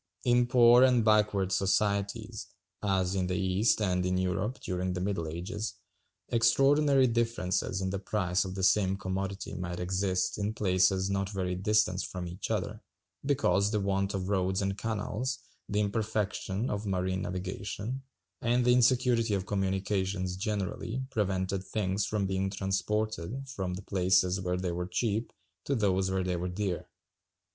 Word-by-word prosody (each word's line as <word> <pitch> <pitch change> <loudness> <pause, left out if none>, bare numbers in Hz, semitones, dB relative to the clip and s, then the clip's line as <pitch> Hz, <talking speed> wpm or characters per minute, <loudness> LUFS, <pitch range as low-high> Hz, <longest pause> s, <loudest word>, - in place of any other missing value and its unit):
In 120 0 +3
poor 120 0 +7
and 125 -3 +5
backward 105 -3 +3
societies, 100 +3 0 0.3
as 95 -2 +1
in 95 -2 0
the 90 - -1
East, 95 +4 +2
and 90 -2 +1
in 90 0 0
Europe 95 +7 -1
during 90 0 -2
the 90 - -3
middle 95 -3 -2
ages, 95 +7 -4 0.5
extraordinary 135 +4 +4
differences 115 -6 0
in 95 0 -1
the 100 - -2
price 95 -2 0
of 95 -1 -6
the 95 - -3
same 95 0 +3
commodity 95 +1 -4
might 90 -1 -4
exist 95 +1 0
in 105 +2 -1
places 95 -1 +2
not 100 0 -1
very 95 -3 -2
distant 100 0 +2
from 90 -1 -5
each 90 +4 -6
other, 105 0 -2 0.4
because 105 -9 +2
the 105 0 0
want 100 0 0
of 95 -1 -3
roads 95 -1 +1
and 100 0 -1
canals, 115 +5 -2 0.3
the 105 - 0
imperfection 105 +1 -1
of 105 0 -3
marine 95 0 -1
navigation, 105 +6 -4 0.4
and 120 +1 +2
the 125 - +5
insecurity 120 -3 +3
of 95 -1 -2
communications 95 -1 -1
generally, 105 +5 -3
prevented 95 -3 -1
things 95 0 -1
from 105 0 0
being 95 0 -1
transported 105 +4 -2
from 95 -8 -3
the 95 - -8
places 95 -1 +2
where 90 -1 -1
they 90 -1 -2
were 90 +1 -3
cheap 110 +3 -1 0.3
to 140 - 0
those 95 -4 +1
where 95 0 0
they 90 -1 -1
were 90 +1 -3
dear. 90 -1 -3
100 Hz, 155 wpm, -30 LUFS, 95-110 Hz, 0.5 s, poor